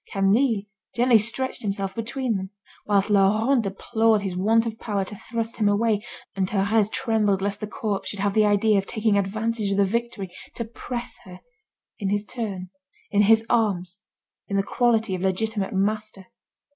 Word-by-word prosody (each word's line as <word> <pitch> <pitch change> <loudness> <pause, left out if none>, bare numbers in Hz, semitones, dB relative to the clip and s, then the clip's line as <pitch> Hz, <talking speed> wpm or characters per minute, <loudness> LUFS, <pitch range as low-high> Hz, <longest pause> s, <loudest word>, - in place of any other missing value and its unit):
Camille 205 +3 +2 0.3
gently 240 -1 +5
stretched 235 +5 0
himself 195 -2 -2
between 235 +2 -2
them, 190 0 -4 0.4
whilst 205 0 +2
Laurent 215 +6 +4
deplored 220 +1 +1
his 190 -2 -3
want 220 +5 +3
of 225 -1 -5
power 200 -3 -2
to 210 - -9
thrust 230 +2 -4
him 210 -2 +3
away, 210 0 +2 0.3
and 190 -1 0
Thérèse 205 +1 +2
trembled 220 -6 +1
lest 200 +1 -2
the 210 - -4
corpse 210 -1 -3
should 205 - -6
have 200 0 0
the 215 0 +4
idea 205 0 +3
of 195 - -5
taking 220 -2 +1
advantage 215 +2 -1
of 195 - 0
the 200 - +4
victory 220 -3 -3 0.2
to 235 - -3
press 235 +2 -5
her, 180 -1 -11 0.6
in 200 -3 -1
his 205 +1 0
turn, 195 -6 -5 0.4
in 205 - +4
his 220 +2 +5
arms, 200 -6 0 0.5
in 200 - -1
the 195 - +2
quality 225 -2 +1
of 185 - -3
legitimate 195 +2 -1
master. 205 0 -2
210 Hz, 170 wpm, -24 LUFS, 195-225 Hz, 0.6 s, gently